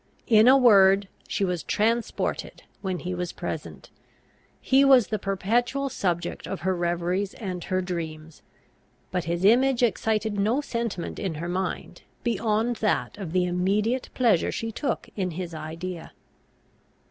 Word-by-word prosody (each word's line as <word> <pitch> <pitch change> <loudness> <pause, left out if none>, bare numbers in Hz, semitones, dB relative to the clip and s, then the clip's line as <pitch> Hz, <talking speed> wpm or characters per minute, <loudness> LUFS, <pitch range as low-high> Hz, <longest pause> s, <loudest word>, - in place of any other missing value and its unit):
In 220 -1 +5
a 265 +2 +8
word, 200 -5 +6 0.2
she 200 -1 0
was 180 -3 -2
transported 225 +6 -1 0.2
when 190 -2 -2
he 180 +1 -4
was 180 -1 -3
present; - - -7 0.7
he 270 +1 +4
was 265 -5 +6
the 215 -2 -1
perpetual 240 +8 0
subject 175 -7 -2
of 195 - -5
her 185 +1 0
reveries 175 +3 -1
and 185 -5 -5
her 185 0 0
dreams; 160 -3 -6 0.7
but 180 -2 -2
his 170 +2 -1
image 250 +3 +4
excited 215 -1 0
no 220 +7 +2
sentiment 235 -10 -4
in 190 -6 -3
her 165 +3 -4
mind 185 +2 -4 0.2
beyond 230 0 0
that 215 - 0
of 185 -6 -5
the 180 0 +2
immediate 200 +8 0
pleasure 225 -9 +3
she 225 0 -3
took 275 +5 -3
in 185 -3 -1
his 175 -2 -5
idea. 165 +3 -6
195 Hz, 145 wpm, -26 LUFS, 180-230 Hz, 0.7 s, a